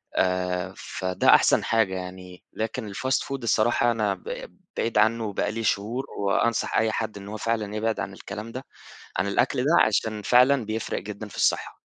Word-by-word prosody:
آآ، 90 Hz, 0 st, 0 dB
فده 95 Hz, -1 st, -2 dB
أحسن -, -, +4 dB
حاجة 110 Hz, -5 st, +1 dB
يعني. 90 Hz, 0 st, -8 dB
لكن 110 Hz, -1 st, -4 dB
الfast 130 Hz, +5 st, 0 dB
food 135 Hz, 0 st, -4 dB
الصراحة 115 Hz, +2 st, +3 dB
أنا 110 Hz, -3 st, 0 dB
ب -, -, -8 dB, 0.2 s
بعيد 115 Hz, -1 st, 0 dB
عنه، 110 Hz, +2 st, +3 dB
وبقى 105 Hz, 0 st, -1 dB
لي 115 Hz, +1 st, -4 dB
شهور، 110 Hz, +5 st, -1 dB
وأنصح 105 Hz, +3 st, +1 dB
أي 110 Hz, 0 st, +2 dB
حد 110 Hz, -1 st, -3 dB
إنه 100 Hz, +1 st, -9 dB
هو -, -, -4 dB
فعلًا 110 Hz, -2 st, -2 dB
يبعد 110 Hz, +1 st, -1 dB
عن -, -, -4 dB
الكلام 110 Hz, +2 st, -7 dB
ده 130 Hz, +3 st, -7 dB, 0.5 s
عن 95 Hz, -, +1 dB
الأكل 100 Hz, +6 st, +1 dB
ده، 150 Hz, -, +3 dB
عشان 110 Hz, 0 st, 0 dB
فعلًا 125 Hz, +3 st, +5 dB
بيفرِق 110 Hz, +1 st, -3 dB
جدًا 105 Hz, +2 st, -7 dB
في -, -, -12 dB
الصحة. -, -, 0 dB
110 Hz, 175 wpm, -25 LUFS, 100-115 Hz, 0.5 s, فعلًا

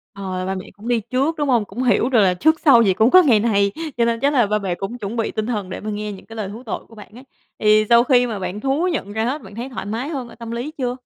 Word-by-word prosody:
Ờ, 185 Hz, -2 st, -4 dB
ba 190 Hz, +1 st, -2 dB
mẹ 185 Hz, -, -6 dB
cũng 210 Hz, +4 st, -12 dB
đi 240 Hz, -2 st, +1 dB
trước, 275 Hz, +6 st, +1 dB
đúng 290 Hz, -, -1 dB
hông? 235 Hz, -4 st, +2 dB
Cũng 220 Hz, +7 st, -5 dB
hiểu 245 Hz, 0 st, +2 dB
được 245 Hz, -, +3 dB
là 190 Hz, -3 st, +4 dB
trước 315 Hz, -, +2 dB
sau 250 Hz, -6 st, +6 dB
gì 195 Hz, -4 st, +3 dB
cũng 220 Hz, +6 st, +3 dB
có 370 Hz, -, +8 dB
ngày 245 Hz, -10 st, +4 dB
này, 200 Hz, -3 st, +2 dB, 0.3 s
cho 235 Hz, -, +3 dB
nên 230 Hz, 0 st, 0 dB
chắc 280 Hz, +4 st, +1 dB
là 245 Hz, -6 st, +3 dB
ba 210 Hz, +1 st, 0 dB
mẹ 190 Hz, -3 st, -2 dB
cũng 195 Hz, +7 st, -5 dB
chuẩn 210 Hz, 0 st, -5 dB
bị 225 Hz, -, -1 dB
tinh 215 Hz, -, -3 dB
thần 210 Hz, -6 st, -3 dB
để -, -, -6 dB
mà 215 Hz, -, -6 dB
nghe 210 Hz, 0 st, -4 dB
những 195 Hz, -, -11 dB
cái 225 Hz, -, -12 dB
lời 210 Hz, -3 st, -4 dB
thú 225 Hz, +5 st, -9 dB
tội -, -, -3 dB
của 225 Hz, -, -17 dB
bạn 210 Hz, -1 st, -13 dB
ấy. 255 Hz, -, -12 dB, 0.4 s
Thì 215 Hz, 0 st, +4 dB
sau 235 Hz, 0 st, +6 dB
khi 245 Hz, -1 st, +3 dB
mà 215 Hz, -3 st, -4 dB
bạn 185 Hz, +2 st, -4 dB
thú 275 Hz, +8 st, 0 dB
nhận 240 Hz, -, -3 dB
ra 220 Hz, +1 st, -1 dB
hết, 275 Hz, +5 st, -2 dB
bạn 200 Hz, -2 st, -13 dB
thấy 240 Hz, +3 st, -5 dB
thoải 245 Hz, -, -6 dB
mái 230 Hz, +8 st, -4 dB
hơn 265 Hz, -6 st, -5 dB
ở -, -, -13 dB
tâm 230 Hz, -1 st, -8 dB
lý 240 Hz, +6 st, -4 dB
chưa? 250 Hz, -2 st, -1 dB
230 Hz, 320 wpm, -20 LUFS, 205-250 Hz, 0.4 s, có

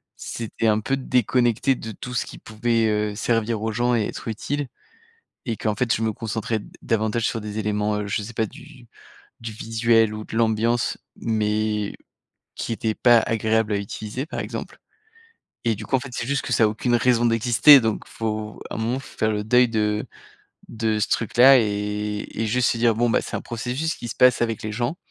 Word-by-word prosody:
c'était 115 Hz, 0 st, -4 dB
un 110 Hz, -1 st, +3 dB
peu 135 Hz, +5 st, 0 dB
déconnecté 125 Hz, 0 st, +2 dB
de 115 Hz, -, -7 dB
tout 125 Hz, +4 st, -8 dB
ce 120 Hz, -, 0 dB
qui -, -, -10 dB
pouvait, 115 Hz, +1 st, 0 dB
heu, 105 Hz, -1 st, -1 dB
servir 115 Hz, 0 st, 0 dB
aux 110 Hz, -, -1 dB
gens 120 Hz, +2 st, +1 dB
et 115 Hz, -, +2 dB
être -, -, -8 dB
utile 140 Hz, +6 st, -3 dB, 0.8 s
et 115 Hz, -, 0 dB
qu'en 110 Hz, -1 st, -1 dB
fait, 115 Hz, +1 st, +1 dB
je -, -, -4 dB
me 110 Hz, -, +1 dB
concentrais 110 Hz, +1 st, -3 dB
d 100 Hz, -, -13 dB
davantage 110 Hz, +1 st, 0 dB
sur 115 Hz, -, -2 dB
des 105 Hz, 0 st, -6 dB
éléments, 105 Hz, 0 st, 0 dB
heu, 105 Hz, -, -5 dB
je 105 Hz, +1 st, -1 dB
sais 115 Hz, +3 st, -8 dB
pas, 110 Hz, 0 st, 0 dB
du 130 Hz, +1 st, -14 dB, 0.5 s
du 115 Hz, -1 st, -6 dB
visuel 115 Hz, 0 st, +2 dB
ou 110 Hz, 0 st, -6 dB
de 110 Hz, -, -7 dB
l'ambiance 115 Hz, +1 st, +1 dB, 0.2 s
mais 105 Hz, -1 st, -1 dB, 0.6 s
qui -, -, -4 dB
étaient 110 Hz, 0 st, -1 dB
pas 120 Hz, -2 st, +5 dB
agréables 110 Hz, -1 st, 0 dB
à -, -, +1 dB
utiliser, 105 Hz, +5 st, -5 dB
par -, -, -5 dB
exemple -, -, -6 dB, 0.9 s
et 115 Hz, -1 st, +2 dB
du 105 Hz, +2 st, -8 dB
coup, 135 Hz, -, +1 dB
en -, -, -2 dB
fait, 140 Hz, -, -7 dB
c'est 120 Hz, -, -3 dB
juste 140 Hz, 0 st, 0 dB
que 125 Hz, -, -2 dB
ça 115 Hz, -, +4 dB
a -, -, +4 dB
aucune 115 Hz, +3 st, 0 dB
raison 120 Hz, 0 st, +3 dB
d'exister, 120 Hz, +5 st, +6 dB
donc 110 Hz, -2 st, -1 dB
il -, -, -17 dB
faut, 110 Hz, -1 st, -4 dB
à -, -, -4 dB
un -, -, -4 dB
moment, 115 Hz, +3 st, 0 dB
il 135 Hz, -, -4 dB
faut -, -, -15 dB
faire 110 Hz, -, +1 dB
le 105 Hz, -1 st, -2 dB
deuil 125 Hz, +3 st, +4 dB
de 105 Hz, -1 st, 0 dB, 0.6 s
de 110 Hz, -1 st, -1 dB
ce 105 Hz, -, +1 dB
truc-là 125 Hz, +4 st, +5 dB
et 105 Hz, -1 st, -2 dB, 0.2 s
et 110 Hz, -, 0 dB
juste 125 Hz, +3 st, +2 dB
se -, -, -2 dB
dire: 115 Hz, -1 st, +3 dB
«Bon, 120 Hz, +2 st, +2 dB
bah, -, -, +2 dB
c'est -, -, -6 dB
un -, -, -6 dB
processus 125 Hz, +8 st, -3 dB
qui 120 Hz, -, -7 dB
se 120 Hz, -, -6 dB
passe 125 Hz, -1 st, +5 dB
avec 115 Hz, -2 st, -2 dB
les 110 Hz, -, -3 dB
gens 120 Hz, +8 st, -2 dB
115 Hz, 215 wpm, -23 LUFS, 105-120 Hz, 0.9 s, d'exister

